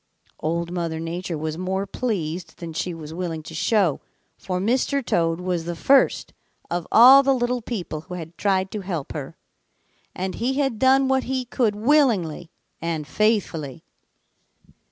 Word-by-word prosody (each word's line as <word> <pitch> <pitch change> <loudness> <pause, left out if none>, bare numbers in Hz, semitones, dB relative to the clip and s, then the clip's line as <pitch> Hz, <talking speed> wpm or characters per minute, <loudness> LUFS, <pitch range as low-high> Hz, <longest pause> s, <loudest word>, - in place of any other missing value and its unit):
"Old 170 +2 -2
Mother 170 -2 -3
Nature 170 +1 -4
was 155 +2 -4
more 190 +2 -1
pleased 180 -6 -3
than 170 -2 -7
she 180 +3 -2
was 160 -2 -8
willing 165 -2 -4
to 160 - -10
show, 180 -1 +1 0.3
for 180 -1 -4
Mr. 255 +6 0
Toad 165 0 +1
was 180 -2 -2
the 175 0 -3
first 270 +10 +3 0.4
of 175 -1 -2
all 255 +4 +9
the 275 -1 +2
little 245 0 -1
people 185 -9 -5
who 180 +2 -8
had 165 -1 -8
tried 190 -1 0
to 210 - -4
help 175 -7 -4
her, 150 +1 -6 0.8
and 185 +1 -3
he 250 +4 -1
had 270 -6 0
done 265 +1 +4
what 265 0 +1
he 260 0 -2
could 235 -3 0
willingly 210 - +2 0.3
and 165 -2 -2
faithfully. 175 - 0
185 Hz, 155 wpm, -23 LUFS, 165-235 Hz, 0.8 s, all